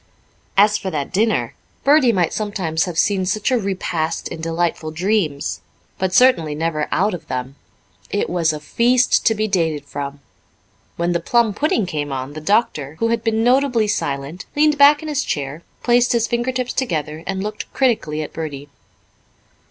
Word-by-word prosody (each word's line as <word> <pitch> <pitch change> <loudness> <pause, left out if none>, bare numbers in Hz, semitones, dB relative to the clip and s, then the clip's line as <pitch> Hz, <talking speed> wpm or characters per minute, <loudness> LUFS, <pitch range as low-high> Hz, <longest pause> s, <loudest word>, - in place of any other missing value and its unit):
As 210 +1 +5
for 190 - -4
that 150 -2 -4
dinner 220 +3 +1 0.3
Bertie 280 -3 +5
might 180 -6 +1
sometimes 190 -7 -1
have 175 -3 -6
seen 195 0 +2
such 210 +6 0
a 255 - +3
repast 185 -5 -2
in 160 - -7
delightful 165 -1 -1
dreams, 165 -3 -1 0.4
but 190 -1 0
certainly 175 -11 +4
never 155 -1 -1
out 205 +3 +1
of 175 - -7
them. 130 +1 -4 0.5
It 205 - -1
was 170 -2 +1
a 155 - -5
feast 245 +10 +2
to 225 - +3
be 215 +1 0
dated 160 -7 0
from. 140 0 -6 0.8
When 170 +1 0
the 170 - +1
plum 235 0 +2
pudding 235 -4 +1
came 150 -5 -3
on, 135 +1 -4
the 155 - -7
doctor, 155 - 0
who 230 - 0
had 230 -1 0
been 225 -1 +1
notably 250 -3 +3
silent, 145 -4 -3
leaned 300 0 +3
back 290 +2 +6
in - - -6
his 295 -2 0
chair, 145 +2 -3 0.2
placed 245 0 +3
his 235 -1 +2
finger 240 +2 -1
tips 255 -1 -3
together, 160 - -2
and 190 0 -2
looked 210 0 -6
critically 215 - 0
at - - -9
Bertie. 145 -3 -6
190 Hz, 175 wpm, -20 LUFS, 155-230 Hz, 0.8 s, back